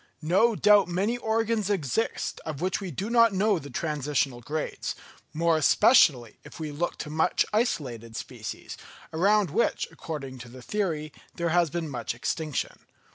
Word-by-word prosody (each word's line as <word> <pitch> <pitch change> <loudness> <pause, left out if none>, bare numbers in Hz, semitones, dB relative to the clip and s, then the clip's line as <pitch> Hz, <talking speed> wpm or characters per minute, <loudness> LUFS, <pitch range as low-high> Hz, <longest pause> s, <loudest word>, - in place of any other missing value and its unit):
No 195 +8 +3
doubt 205 -1 +5
many 190 +7 0
organs 225 -2 0
exist 195 - -1
of 155 -3 -5
which 185 +4 -1
we 190 - -4
do 180 +6 -4
not 230 -3 +4
know 200 -1 +2
the 140 - -10
transitional 145 -3 -1
grades, 150 +5 -4 0.4
more 165 +1 +2
especially 155 - +4
if 145 - -12
we 155 -2 -4
look 165 +4 -2
to 150 - -6
much 160 +1 +2
isolated 130 - -1
species, - - -7 0.4
around 195 +1 +3
which, 225 +8 +1
according 135 -5 -7
to 120 0 -10
the 125 +1 -12
theory, 160 -7 -2 0.2
there 170 -1 -1
has 170 0 +3
been 170 +1 -3
much 120 -4 -4
extinction. 155 +4 -3
165 Hz, 155 wpm, -27 LUFS, 145-205 Hz, 0.4 s, doubt